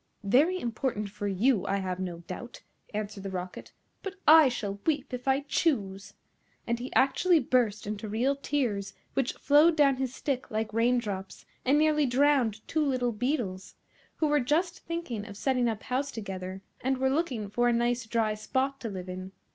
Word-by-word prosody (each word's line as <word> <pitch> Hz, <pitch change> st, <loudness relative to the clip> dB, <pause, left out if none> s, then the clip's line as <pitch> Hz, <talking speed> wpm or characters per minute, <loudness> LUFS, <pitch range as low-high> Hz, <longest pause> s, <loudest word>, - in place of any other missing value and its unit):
"Very 290 Hz, -, +3 dB
important 230 Hz, -, -2 dB
for 205 Hz, 0 st, -4 dB
you, 205 Hz, +2 st, +2 dB
I 195 Hz, -, +1 dB
have 185 Hz, -2 st, -3 dB
no 175 Hz, -2 st, -4 dB
doubt," 210 Hz, +8 st, -8 dB, 0.3 s
answered 210 Hz, -1 st, -4 dB
the 195 Hz, -, -5 dB
Rocket, 180 Hz, -1 st, -6 dB, 0.3 s
"but 390 Hz, -1 st, -6 dB
I 310 Hz, -2 st, +9 dB
shall 205 Hz, -5 st, -4 dB
weep 290 Hz, -4 st, -1 dB
if 250 Hz, +1 st, -5 dB
I 270 Hz, +1 st, +3 dB
choose;" 205 Hz, -, -1 dB, 0.5 s
and 235 Hz, 0 st, -1 dB
he 250 Hz, +2 st, -6 dB
actually 330 Hz, +6 st, +4 dB
burst 230 Hz, -7 st, +1 dB
into 210 Hz, +1 st, -4 dB
real 245 Hz, +7 st, +1 dB
tears, 240 Hz, -9 st, -2 dB, 0.2 s
which 270 Hz, -2 st, 0 dB
flowed 300 Hz, +4 st, +5 dB
down 280 Hz, -3 st, +4 dB
his 260 Hz, -1 st, -3 dB
stick 270 Hz, -3 st, -2 dB
like 220 Hz, 0 st, -2 dB
rain 235 Hz, +2 st, +3 dB
drops, 195 Hz, -5 st, -5 dB, 0.2 s
and 275 Hz, +3 st, +3 dB
nearly 300 Hz, -1 st, +3 dB
drowned 250 Hz, -5 st, +2 dB
two 315 Hz, -1 st, +1 dB
little 255 Hz, -4 st, +1 dB
beetles, 215 Hz, -5 st, -2 dB, 0.4 s
who 315 Hz, -, 0 dB
were 295 Hz, -1 st, +3 dB
just 330 Hz, +8 st, 0 dB
thinking 335 Hz, -11 st, -4 dB
of 205 Hz, -2 st, -9 dB
setting 250 Hz, 0 st, +1 dB
up 220 Hz, -2 st, -4 dB
house 265 Hz, +3 st, -1 dB
together, 190 Hz, -4 st, -6 dB, 0.2 s
and 265 Hz, +1 st, +1 dB
were 265 Hz, 0 st, +1 dB
looking 270 Hz, -9 st, -1 dB
for 240 Hz, +4 st, +1 dB
a -, -, +4 dB
nice 240 Hz, 0 st, 0 dB
dry 220 Hz, -1 st, +1 dB
spot 265 Hz, +5 st, -1 dB
to 230 Hz, -, -3 dB
live 185 Hz, -2 st, -6 dB
in. 185 Hz, +1 st, -7 dB
240 Hz, 180 wpm, -29 LUFS, 205-275 Hz, 0.5 s, I